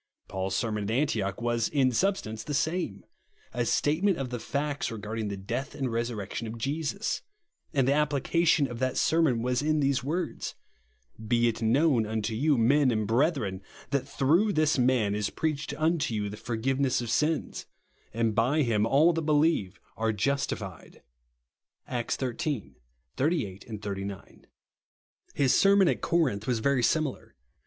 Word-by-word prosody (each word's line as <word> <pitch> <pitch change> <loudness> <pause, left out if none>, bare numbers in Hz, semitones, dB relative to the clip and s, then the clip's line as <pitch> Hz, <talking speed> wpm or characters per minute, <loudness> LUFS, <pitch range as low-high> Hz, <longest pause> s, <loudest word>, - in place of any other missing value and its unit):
Paul's 95 0 -3
sermon 105 -3 -1
at - - -3
Antioch 110 -6 0
was, 120 -1 +1
in 135 -3 +2
substance 115 - -1
the 145 - -3
same, 140 - -1 0.2
— - - -34
a 120 +1 0
statement 175 +6 +2
of 130 -2 -4
the 120 - -3
facts 145 +3 -2
re 115 - -6
garding 110 +1 -4
the 100 -1 -4
death 120 +9 -4
and 135 -4 -2
resurrection 115 -1 -3
of 110 +1 -6
Jesus; 155 - -2 0.5
and 135 -3 +1
the 140 - +4
application 150 +2 +2
of 120 -2 -7
that 130 0 -1
sermon 155 -8 +2
was 125 +1 +1
in 155 +1 +1
these 140 -2 +1
words, 165 +7 -3 0.7
"Be 120 +1 +3
it 115 -1 -2
known 120 0 +3
unto 110 0 -2
you, 140 +5 +2
men 135 +4 +4
and 110 -3 0
brethren, 115 - 0 0.3
that 140 -2 0
through 170 +10 +2
this 155 -3 +2
man 120 -5 +2
is 105 -1 -1
preached 155 -1 -2
unto 155 -6 +1
you 105 -1 -2
the 105 - -7
forgiveness 130 +4 0
of 120 -2 -4
sins: 155 +4 -1 0.4
and 115 0 0
by 130 +8 +2
him 110 -3 +1
all 155 +7 +4
that 165 - -1
believe 150 - +1 0.2
are 110 +1 +1
justified," 105 -5 -3 0.8
(Acts 120 -2 -2
xiii. 135 - -3 0.4
38, 130 - -1
39). 100 -1 -7 0.9
His 135 -3 +3
sermon 195 -1 +5
at - - 0
Corinth 135 -12 0
was 125 -2 +1
very 135 +3 +1
similar. 150 - -1
130 Hz, 155 wpm, -28 LUFS, 110-150 Hz, 0.9 s, sermon